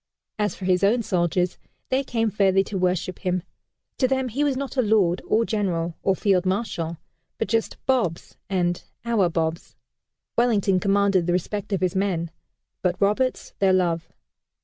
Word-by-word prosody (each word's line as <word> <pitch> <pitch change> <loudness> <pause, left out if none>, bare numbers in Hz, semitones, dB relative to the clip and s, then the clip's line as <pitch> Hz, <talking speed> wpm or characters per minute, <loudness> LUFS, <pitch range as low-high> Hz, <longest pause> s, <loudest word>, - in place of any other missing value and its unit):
As 210 -1 0
for 190 - -7
his 185 0 +2
own 230 +4 +3
soldiers, 180 -2 0 0.3
they 265 +1 +1
came 225 -4 0
fairly 195 -2 +3
to 200 - -7
worship 180 0 0
him. 180 -2 -1 0.6
To 255 - +4
them 265 -1 0
he 270 +6 -1
was 280 -3 +1
not 275 0 -4
a 260 - +3
Lord, 205 -6 +2
or 230 +1 +3
General, 175 -7 -1
or 195 - +2
Field 190 -2 +2
Marshal, 185 -4 -2 0.4
but - - -1
just 225 +2 0
"Bobs" 235 -11 0
and 175 -2 0 0.2
"Our 220 -6 +2
Bobs." 165 0 -2 0.6
Wellington 210 -6 +3
commanded 195 -2 +2
the 175 - +2
respect 200 +3 -2
of 195 - 0
his 185 0 0
men, 180 -4 0 0.5
but 180 -1 0
Roberts 210 +6 0
their 195 -1 +4
love. 170 -3 +1
195 Hz, 165 wpm, -24 LUFS, 180-220 Hz, 0.6 s, To